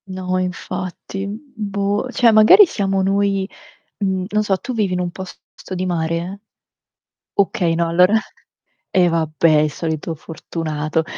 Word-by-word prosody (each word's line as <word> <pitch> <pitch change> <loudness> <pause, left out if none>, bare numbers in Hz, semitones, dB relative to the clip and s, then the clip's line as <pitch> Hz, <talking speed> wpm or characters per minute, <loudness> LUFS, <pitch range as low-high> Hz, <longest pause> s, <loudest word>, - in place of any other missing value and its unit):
No 185 -1 -3
infatti. 185 +1 -5
Mhmm, 205 +2 -5 0.2
boh, 205 +2 -2
cioè 240 -2 +4
magari 215 - +8
siamo 195 - -1
noi. 195 0 +1 0.5
Mhmm, 190 -2 -1
non 215 0 +1
so 200 -2 +1
tu 255 - -6
vivi 210 -5 0
in 180 - -1
un 180 -1 -1
posto 190 +1 -10
di 185 +1 -2
mare? 170 +2 -2 1.0
Okay, 175 -4 +2
no 170 0 +1
allora 180 +4 +4 0.8
e 180 -2 +3
vabbè, 160 -1 +1
il 150 0 +1
solito 160 +1 -3
fortunato. 160 0 -3
185 Hz, 140 wpm, -19 LUFS, 165-200 Hz, 1.0 s, magari